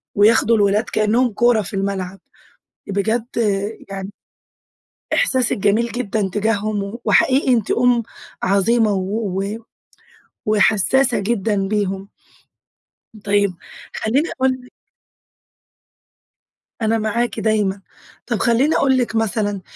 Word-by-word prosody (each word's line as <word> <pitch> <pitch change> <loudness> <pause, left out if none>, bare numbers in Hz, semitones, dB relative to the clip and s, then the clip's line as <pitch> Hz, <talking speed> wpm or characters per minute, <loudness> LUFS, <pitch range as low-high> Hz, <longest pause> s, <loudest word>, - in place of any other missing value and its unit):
وياخدوا 225 +2 +4
الولاد 205 +1 +2
كأنّهم 225 +3 +1
كورة 235 0 +3
في 200 - -7
الملعب. 195 -1 -3 0.7
بجد 220 +4 -1 0.6
يعني 195 0 -6 1.0
إحساسك 260 - +1
جميل 210 +4 +2
جدًا 215 -4 -2
تجاههم، 210 0 -1
وحقيقي 265 -1 +3
أنتِ 225 -4 0
أم 240 -1 +3 0.4
عظيمة 210 +3 +2
و 195 +1 -2 0.9
وحساسة 220 +4 +3
جدًا 200 -2 -1
بيهم. 195 -2 -2 1.2
طيّب 200 -2 +1 0.4
خلّيني 270 +9 0
أقول 265 0 +1
لِك 250 - -19 2.1
أنا 225 +1 +2
معاكِ 225 +1 -1
دايمًا، 210 -2 0 0.5
طَب - - -1
خلّيني 255 +6 +2
أقول 265 -1 +3
لِك 240 -2 -1
مثلًا، 210 -3 -1
215 Hz, 95 wpm, -19 LUFS, 200-235 Hz, 2.1 s, وياخدوا